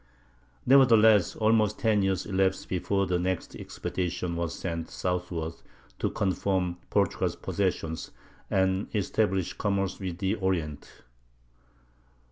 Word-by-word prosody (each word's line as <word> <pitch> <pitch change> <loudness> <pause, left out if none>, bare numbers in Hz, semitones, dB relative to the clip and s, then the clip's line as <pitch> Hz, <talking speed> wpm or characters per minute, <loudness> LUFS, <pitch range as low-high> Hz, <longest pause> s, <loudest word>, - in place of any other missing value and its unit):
Nevertheless 110 -8 +6
almost 110 -1 +2
ten 110 -3 +2
years 95 -1 0
elapsed 95 -1 0
before 100 +2 0
the 90 -1 0
next 90 0 -2
expedition 90 -1 -3
was 85 -1 -3
sent 85 -2 -4
southward 90 -3 -3 0.5
to - - 0
confirm 95 -2 -1
Portugal's - - +1
possessions, 80 -1 -2 0.4
and 95 +1 +1
establish 95 -2 0
commerce 100 -2 -1
with 90 -3 -4
the 95 +1 0
Orient. 90 -8 -3
95 Hz, 105 wpm, -28 LUFS, 90-100 Hz, 0.5 s, Nevertheless